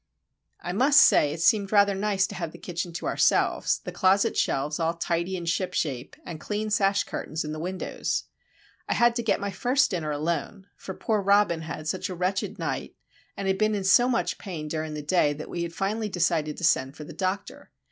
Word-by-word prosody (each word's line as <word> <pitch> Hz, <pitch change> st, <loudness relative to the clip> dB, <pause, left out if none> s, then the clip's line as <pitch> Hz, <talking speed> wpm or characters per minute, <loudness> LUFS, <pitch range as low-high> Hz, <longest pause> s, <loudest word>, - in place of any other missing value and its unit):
I 175 Hz, -, -4 dB
must 270 Hz, +8 st, +5 dB
say 145 Hz, -, +5 dB
it 160 Hz, +2 st, -5 dB
seemed 200 Hz, +1 st, +3 dB
rather 200 Hz, -1 st, +5 dB
nice 195 Hz, 0 st, +1 dB
to 205 Hz, -, -7 dB
have 170 Hz, -4 st, -5 dB
the -, -, -10 dB
kitchen 175 Hz, 0 st, -5 dB
to -, -, -5 dB
ourselves, -, -, +2 dB
the -, -, -5 dB
closet 195 Hz, +3 st, +2 dB
shelves 145 Hz, +4 st, 0 dB
all 165 Hz, 0 st, 0 dB
tidy 170 Hz, +2 st, -1 dB
and 170 Hz, -1 st, -6 dB
ship 185 Hz, +2 st, -1 dB
shape, 135 Hz, -4 st, -2 dB
and 165 Hz, -3 st, -7 dB
clean 210 Hz, +5 st, -3 dB
sash 200 Hz, -1 st, +2 dB
curtains 155 Hz, 0 st, -4 dB
in 150 Hz, -, -4 dB
the 155 Hz, -, -5 dB
windows. 185 Hz, +3 st, -3 dB, 0.7 s
I -, -, +1 dB
was 240 Hz, 0 st, +5 dB
to -, -, 0 dB
get 225 Hz, -, +1 dB
my 200 Hz, 0 st, -3 dB
first 250 Hz, +8 st, +1 dB
dinner 165 Hz, -5 st, -2 dB
alone, 165 Hz, +5 st, -3 dB
for 190 Hz, -, -8 dB
poor 220 Hz, -2 st, 0 dB
little 195 Hz, -, -5 dB
Robin 200 Hz, -5 st, +4 dB
had 155 Hz, -1 st, -6 dB
had 185 Hz, -, -4 dB
a 185 Hz, -, -5 dB
wretched 185 Hz, +2 st, -2 dB
night, -, -, -4 dB, 0.4 s
and 195 Hz, -1 st, 0 dB
been 215 Hz, 0 st, +2 dB
in 200 Hz, -, -2 dB
so 240 Hz, +6 st, +5 dB
much 235 Hz, -, -1 dB
pain 165 Hz, -6 st, -6 dB
during 155 Hz, 0 st, -4 dB
the 150 Hz, -, -5 dB
day 150 Hz, -1 st, +2 dB
that 150 Hz, +1 st, -8 dB
we 175 Hz, -, -3 dB
had 170 Hz, 0 st, -3 dB
finally 210 Hz, +5 st, -2 dB
decided 170 Hz, -4 st, 0 dB
to -, -, -8 dB
send 135 Hz, -4 st, +2 dB
for 150 Hz, -, -7 dB
the -, -, -10 dB
doctor. 190 Hz, +1 st, -4 dB
185 Hz, 215 wpm, -26 LUFS, 160-200 Hz, 0.7 s, must